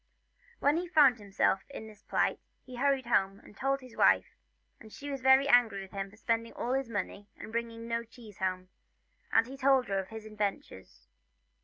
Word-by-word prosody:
When 290 Hz, +3 st, +2 dB
he 355 Hz, +1 st, -2 dB
found 285 Hz, -8 st, +5 dB
himself 195 Hz, -1 st, +1 dB
in 220 Hz, -, -8 dB
this 215 Hz, -2 st, -14 dB
plight -, -, 0 dB, 0.2 s
he 255 Hz, -1 st, -10 dB
hurried 275 Hz, 0 st, +1 dB
home, 195 Hz, -4 st, +1 dB
and -, -, -17 dB
told 275 Hz, +4 st, -1 dB
his 255 Hz, -2 st, -14 dB
wife, 95 Hz, -1 st, +3 dB, 0.5 s
and 215 Hz, -, -14 dB
she 285 Hz, +5 st, -7 dB
was 275 Hz, -1 st, -4 dB
very 265 Hz, +2 st, +5 dB
angry 230 Hz, -7 st, +4 dB
with 190 Hz, -, -13 dB
him 195 Hz, -1 st, -4 dB
for 210 Hz, -, -19 dB
spending 230 Hz, 0 st, -1 dB
all 245 Hz, -, -2 dB
the 265 Hz, -3 st, -2 dB
money 205 Hz, 0 st, -4 dB
and -, -, -9 dB
bringing 230 Hz, 0 st, -4 dB
no 235 Hz, 0 st, -1 dB
cheese 225 Hz, -3 st, -15 dB
home, 185 Hz, -1 st, -2 dB, 0.6 s
and 225 Hz, 0 st, +4 dB
then 250 Hz, -, -11 dB
he 270 Hz, -, -8 dB
told 270 Hz, -3 st, +3 dB
her 195 Hz, -1 st, -1 dB
his 220 Hz, +2 st, -9 dB
adventures. 195 Hz, -, -5 dB
230 Hz, 195 wpm, -30 LUFS, 200-260 Hz, 0.6 s, found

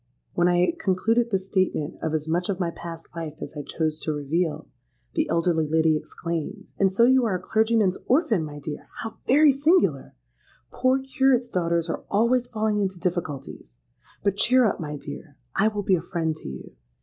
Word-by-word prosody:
When 175 Hz, 0 st, +3 dB
I 175 Hz, 0 st, +3 dB
had 340 Hz, -, +1 dB
concluded 225 Hz, -, +1 dB
this 190 Hz, -3 st, -1 dB
statement 185 Hz, -5 st, -1 dB
of 160 Hz, -1 st, -1 dB
as 155 Hz, 0 st, -2 dB
much 175 Hz, +3 st, 0 dB
of 195 Hz, -2 st, -1 dB
my 170 Hz, -2 st, 0 dB
past 165 Hz, -1 st, -8 dB
life 160 Hz, -2 st, -6 dB
as -, -, -7 dB
I 145 Hz, -, -4 dB
chose 155 Hz, +1 st, -2 dB
to 155 Hz, -, -2 dB
reveal, 150 Hz, +3 st, -1 dB, 0.5 s
the 320 Hz, -4 st, 0 dB
elderly 165 Hz, -2 st, +1 dB
lady 160 Hz, 0 st, +3 dB
exclaimed, 165 Hz, +1 st, -4 dB
'And 195 Hz, -1 st, +4 dB
so 200 Hz, +5 st, +3 dB
you 260 Hz, +1 st, +5 dB
are 205 Hz, -5 st, +1 dB
a -, -, -2 dB
clergyman's 220 Hz, -3 st, +2 dB
orphan, 245 Hz, -, +3 dB
my 150 Hz, -1 st, -7 dB
dear? 145 Hz, +1 st, -7 dB, 0.2 s
How 225 Hz, -, -6 dB
very 295 Hz, +3 st, +6 dB
singular! 305 Hz, +7 st, +2 dB, 0.6 s
Poor 255 Hz, +1 st, +2 dB
curates' 265 Hz, -2 st, +1 dB
daughters 170 Hz, -4 st, 0 dB
are 165 Hz, -, -4 dB
always 235 Hz, +4 st, +2 dB
falling 215 Hz, -2 st, 0 dB
into 190 Hz, -2 st, -1 dB
difficulties. 150 Hz, -, -4 dB, 0.5 s
But 200 Hz, 0 st, +1 dB
cheer 250 Hz, +4 st, +4 dB
up, 210 Hz, -, 0 dB
my 150 Hz, -3 st, -4 dB
dear: 145 Hz, 0 st, -9 dB, 0.2 s
I 210 Hz, -, +3 dB
will 210 Hz, -2 st, -2 dB
be 190 Hz, -, +3 dB
a -, -, -4 dB
friend 165 Hz, -2 st, -2 dB
to 70 Hz, -, -8 dB
you. 65 Hz, 0 st, -9 dB
180 Hz, 190 wpm, -25 LUFS, 160-225 Hz, 0.6 s, very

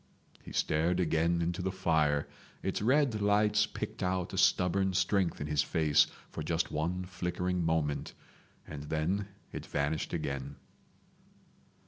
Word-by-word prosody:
He -, -, -11 dB
stared 85 Hz, +4 st, +1 dB
again 85 Hz, 0 st, +2 dB
into 85 Hz, +2 st, -2 dB
the 95 Hz, +1 st, -1 dB
fire. 80 Hz, -6 st, +1 dB, 0.4 s
Its -, -, -1 dB
red 130 Hz, -1 st, +2 dB
lights 105 Hz, +1 st, +3 dB
picked -, -, -6 dB
out 90 Hz, -1 st, -1 dB
a -, -, -3 dB
stubborn 95 Hz, +1 st, +3 dB
strength 90 Hz, 0 st, +1 dB
in 75 Hz, -, -3 dB
his 75 Hz, -1 st, +1 dB
face 80 Hz, -3 st, +3 dB, 0.2 s
for -, -, -5 dB
just 80 Hz, +2 st, -1 dB
one 85 Hz, +4 st, -1 dB
flickering 90 Hz, 0 st, -2 dB
moment, 80 Hz, -3 st, -1 dB, 0.5 s
and 75 Hz, -2 st, -7 dB
then 80 Hz, +7 st, -1 dB, 0.2 s
it -, -, -7 dB
vanished 75 Hz, +2 st, -1 dB
again. 70 Hz, -4 st, -3 dB
85 Hz, 135 wpm, -31 LUFS, 75-95 Hz, 0.5 s, lights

